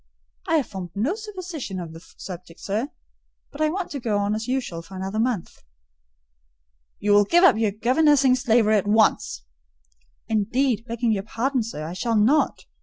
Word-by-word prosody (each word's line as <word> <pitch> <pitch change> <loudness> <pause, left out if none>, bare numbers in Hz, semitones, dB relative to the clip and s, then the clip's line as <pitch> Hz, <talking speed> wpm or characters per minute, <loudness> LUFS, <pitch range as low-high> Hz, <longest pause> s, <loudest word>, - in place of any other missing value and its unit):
"I 325 - +2
have 295 -5 +2
formed 190 -3 -7
no 235 - 0
supposition 365 - -6
on 170 -2 -7
the 165 - -10 0.2
subject, 175 -2 -9
sir; 220 +8 -2 0.6
but 285 - -8
I 310 - +3
want 365 +2 -4
to 285 - -4
go 225 -4 -1
on 205 +1 0
as 220 +2 -3
usual 250 -10 -2
for 180 +3 -13
another 190 +3 -3
month." 225 -6 -2 1.4
"You 205 - 0
will 205 0 +6
give 345 - +3
up 360 - +7
your 220 -2 +2
governessing 260 +5 +3
slavery 225 -3 +3
at 205 - -1
once." 210 - +2 0.8
"Indeed, 225 +2 0
begging 235 0 0
your 200 -3 0
pardon, 245 +6 -1
sir, 215 -9 -5
I 165 - -5
shall 225 +5 -1
not. 230 +9 +2
225 Hz, 175 wpm, -24 LUFS, 200-270 Hz, 1.4 s, up